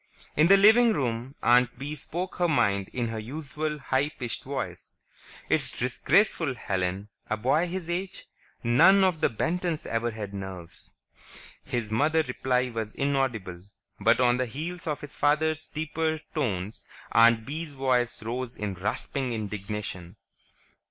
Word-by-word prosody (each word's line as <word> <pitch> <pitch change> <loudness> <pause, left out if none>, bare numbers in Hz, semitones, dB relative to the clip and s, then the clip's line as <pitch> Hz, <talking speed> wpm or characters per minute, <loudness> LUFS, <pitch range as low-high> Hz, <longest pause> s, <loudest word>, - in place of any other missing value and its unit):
In 155 +2 +5
the 195 +2 +8
living 220 +3 +6
room 125 - -2
Aunt 125 0 +4
Bee 140 +3 -5
spoke 175 +5 -5
her 175 - +2
mind 100 - +1
in 120 -2 -2
her 115 -1 -4
usual, 150 +5 -4
high 135 0 0
pitched 120 -6 -5
voice. - - -5 0.5
"It's - - 0
disgraceful, 140 - +2
Helen. 95 -1 -2 0.2
A 110 - 0
boy 140 +10 +2
his 180 -1 -5
age.... 180 +2 -4 0.4
None 170 +12 +6
of 180 -4 +1
the - - +4
Bentons 165 +6 -2
ever 115 +1 -1
had 105 -3 -6
nerves." 95 -3 -8 0.7
His 120 -5 -3
mother's 155 +6 +2
reply 125 0 0
was 110 -2 -4
inaudible, 125 -11 -1 0.4
but 115 +1 +4
on 125 -1 +4
the 130 0 -1
heels 165 +8 -5
of 150 -2 -2
his 150 - -9
father's 155 +1 +1
deeper 160 +1 -2 0.2
tones, 105 - -2 0.3
Aunt 115 -1 +5
Bee's 155 +2 -5
voice 125 -4 0
rose 120 +2 -4
in 105 -2 -3
rasping 120 +7 -2
indignation. 105 -4 -5
130 Hz, 145 wpm, -27 LUFS, 110-155 Hz, 0.7 s, the